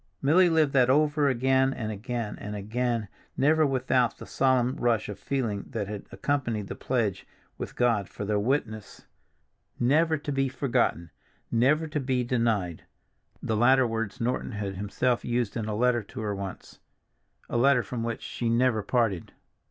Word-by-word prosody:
Milly 175 +6 +4
lived 160 -4 +2
that 130 -2 +4
over 150 +1 +3
again, 130 +1 +2
and 110 -2 -4
again, 110 +1 -4
and 105 +1 -6
again, 115 +2 -2 0.3
never 155 +2 +4
without 130 -2 +1
the - - -9
solemn 130 -1 +2
rush 120 -5 +1
of 105 - -7
feeling 115 -8 -2
that 100 - -3
had 105 -1 -7
accompanied 110 -1 -2
the - - -4
pledge 110 -7 -1 0.3
with - - -6
God 115 -6 +1
for 100 - -6
their 105 0 +1
witness—"never 130 +5 -2
to 145 0 -5
be 135 -1 +1
forgotten, 120 - 0 0.4
never 135 +7 +3
to 150 -1 -3
be 130 -2 0
denied"—the 110 -3 -3
latter 130 +4 +5
words 115 0 -3
Norton 125 +1 -2
had 100 -2 -3
himself 105 +5 -1
used 120 -3 -1
in 110 -3 -3
a 105 - -2
letter 120 +1 +2
to 110 +3 -8
her 105 -2 -2
once, 100 -1 -7 0.7
a - - -5
letter 125 +1 +4
from 125 -2 -5
which 115 -1 -3
she 110 +4 -3
never 115 -1 +2
parted. 110 -5 0
120 Hz, 160 wpm, -27 LUFS, 105-130 Hz, 0.7 s, latter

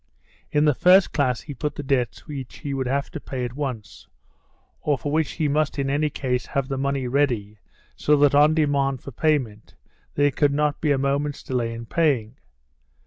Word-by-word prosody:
In 150 +1 +3
the 150 - +4
first 185 +7 +5
class 130 -4 +1
he 145 - -8
put 150 +3 -4
the 145 - -5
debts 130 -3 -1
which 140 -5 -7
he 140 - -5
would 130 -2 -2
have 140 +2 -1
to 165 - -6
pay 130 -3 -4
at 120 - -6
once, 130 -6 -6 0.7
or 145 -2 +1
for 145 - -4
which 155 0 0
he 155 - 0
must 150 0 0
in 135 -1 -1
any 150 +2 +1
case 125 -3 -2
have 135 -1 -2
the 135 - -2
money 140 -1 -1
ready 120 -6 0 0.4
so 150 - +3
that 145 -1 +4
on 150 +2 +5
demand 140 -4 +1
for 140 - -8
payment 125 -7 -1 0.4
there 145 0 +3
could 145 0 +2
not 150 0 0
be 150 - +2
a 140 - +3
moment's 140 +2 -1
delay 120 -3 -2
in 115 0 -7
paying. 130 -6 0
140 Hz, 195 wpm, -23 LUFS, 130-150 Hz, 0.7 s, first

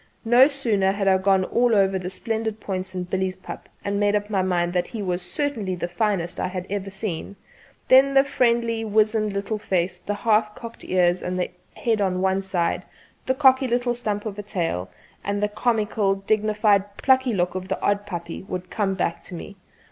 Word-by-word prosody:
No 240 +4 +7
sooner 225 -9 +1
had 200 -1 -1
I 190 -1 +5
gone 190 0 +3
over 240 -1 +3
all - - +3
the 180 0 -4
splendid 220 +2 -2
points 185 -2 -4
in 180 - -2
Billy's 185 +1 -2
pup 185 - -9 0.2
and 200 0 -1
made 205 0 +2
up 205 +1 -2
my 195 -2 +2
mind 175 -2 0
that 180 -1 0
he 225 - -6
was 180 -1 -1
certainly 210 -1 -2
the 175 - -3
finest 175 -1 -1
I - - 0
had 180 -1 -5
ever 200 -1 -3
seen, 195 -1 -5 0.5
than 270 +1 +6
the 270 - +7
friendly 235 -4 +1
wizened 215 0 +2
little 200 +2 -3
face, 185 -4 -1
the 205 +3 -3
half 215 0 +1
cocked 230 0 -9
ears 180 -1 +2
and 180 0 -2 0.3
head 225 -3 0
on 185 -2 0
one 190 +1 +1
side, 185 -3 -1 0.5
the 260 - +2
cocky 265 -1 +5
little 245 0 +1
stump 210 -3 -3
of 210 -1 -5
a - - -2
tail, 170 - -3 0.3
and 200 +1 -2
the - - +3
comical 215 -2 0
dignified 205 0 +1
plucky 260 -3 +3
look 180 -1 0
of 185 0 -5
the - - -2
odd 205 0 0
puppy 170 -3 -5
would 180 -1 -3
all - - -27
come 200 -3 0
back 170 -2 -1
to 180 - -6
me. 200 +4 -8
200 Hz, 200 wpm, -24 LUFS, 185-220 Hz, 0.5 s, No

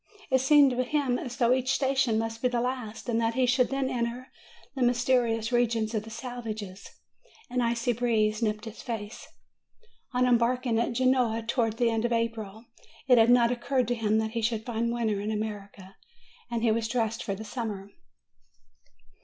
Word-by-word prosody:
It 260 -1 +4
seemed 280 0 +6
to 250 0 0
him 260 -2 0
as 245 0 -6
though 245 -2 +3
each 260 0 0
station 265 -4 +1
must 225 0 -3
be 250 - +3
the 245 -1 -1
last, 245 -2 -4
and 230 -1 +1
that 225 0 0
he 260 -1 +3
should 250 0 +2
then 270 0 -1
enter 245 0 -3 0.4
the 265 - -5
mysterious 245 -2 +1
regions 230 -2 +1
of 215 - 0
the 220 - -11
savages. 220 -5 -7 0.6
An 250 0 0
icy 235 +1 0
breeze 220 -2 +1
nipped 215 0 -1
his 225 0 -9
face. 220 -3 -6 0.8
On 250 -1 +2
embark 245 +1 +2
ing 230 -2 +1
at 235 +1 0
Genoa, 250 -2 +2
towards 230 -2 0
the 235 0 +2
end 225 0 -1
of 240 - 0
April, 225 -1 -3 0.4
it 250 -3 +6
had 225 +1 +5
not 240 -1 +5
oc 240 -1 -4
curred 265 -3 +1
to - - +2
him 220 -2 +1
that 220 0 -1
he 230 0 -2
should 220 -1 -1
find 235 -1 -1
winter 220 -4 -1
in 210 - -3
America, 205 -3 -5 0.5
and 235 -1 -2
he 230 - +4
was 225 0 0
dressed 225 -2 -1
for 195 -1 -3
summer. 210 -4 -5
235 Hz, 185 wpm, -28 LUFS, 220-250 Hz, 0.8 s, seemed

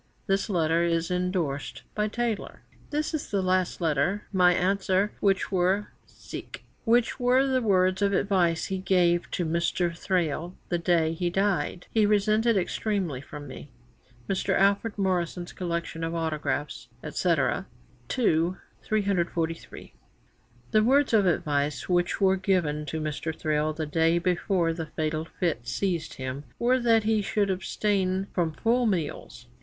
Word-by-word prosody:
This 195 +2 0
letter 165 -3 +2
is 170 0 0
endorsed 180 -6 -2
by 210 0 0
Taylor: 230 -1 -3 0.3
"This 300 +2 -2
is 310 - -3
the 200 -2 0
last 185 -1 +1
letter. 165 +5 0
My 180 -1 +5
answer, 190 +2 +1
which 195 -1 +1
were 190 +2 +1 1.0
the 250 +3 +3
words 185 -2 +2
of 200 0 +3
advice 180 -4 +1
he 190 -1 -3
gave 175 -2 +2
to 175 - -2
Mr. 170 +1 0
Thrale 175 -1 -1
the 175 - 0
day 170 -2 +2
he 175 +1 -1
dyed, 190 -1 0
he 215 -2 +3
resented 215 +2 +3
extremely 185 - -1
from 145 0 -9
me."' 135 +2 -10 0.6
Mr. 190 - 0
Alfred 200 +3 +2
Morrison's 180 -2 -1
Collection 170 -2 -3
of 165 +1 -2
Autographs, 155 -2 -2 0.2
&c., - - -1
ii. - - +5 1.5
343. 175 -6 -2 0.8
'The 215 - +4
words 270 +3 +3
of 205 -4 +5
advice' 145 -3 0
which 175 +2 +1
were 190 -1 +4
given 165 -6 0
to 160 +3 -3
Mr. 155 +1 -3
Thrale 155 0 +1
the 155 0 -4
day 165 +3 +2
before 175 -1 +1
the 160 -1 -5
fatal 155 +1 -2
fit 160 -8 -3
seized 175 -5 -2
him, 130 +2 -5
were 250 +2 +2
that 230 -2 +3
he 215 0 +2
should 200 0 0
abstain 190 0 0
from 170 -3 0
full 235 +8 +1
meals. 165 - -3
180 Hz, 140 wpm, -27 LUFS, 165-200 Hz, 1.5 s, My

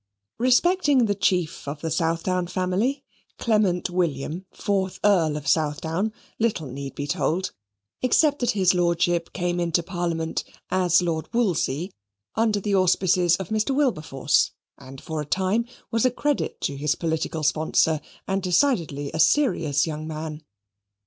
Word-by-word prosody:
Respecting 275 +1 +4
the 205 - +1
chief 180 -7 0
of 145 +1 -5
the 160 - -3
Southdown 170 +3 0
family, 195 +11 -1 0.3
Clement 210 -6 +1
William, 170 0 -2
fourth 190 -2 -2
Earl 170 -7 +3
of 150 - -7
Southdown, 160 +6 0 0.3
little 220 -8 0
need 135 +1 -7
be 145 - -3
told, 170 +5 -1 0.5
except 290 +3 +3
that 245 - 0
his 185 -1 +4
Lordship 170 -1 +1
came 175 -1 -1
into 170 0 +1
Parliament 170 -3 -2 0.3
(as 180 -1 +3
Lord 160 -2 -2
Wolsey) 180 - 0 0.4
under 220 -2 +1
the 205 +1 -2
auspices 185 -2 +3
of 190 -3 -6
Mr. 220 +5 0
Wilberforce, 160 - +1 0.3
and 130 +1 -12
for 160 +1 -4
a - - -3
time 190 +8 0 0.3
was 230 -1 +1
a 255 - +5
credit 290 +3 -1
to 140 - -2
his 150 +2 0
political 160 -1 -2
sponsor, 155 0 +2 0.3
and 195 0 0
decidedly 175 - +1
a 160 - -3
serious 165 - +3
young 155 -1 -5
man. 155 0 -5
175 Hz, 140 wpm, -24 LUFS, 160-205 Hz, 0.5 s, a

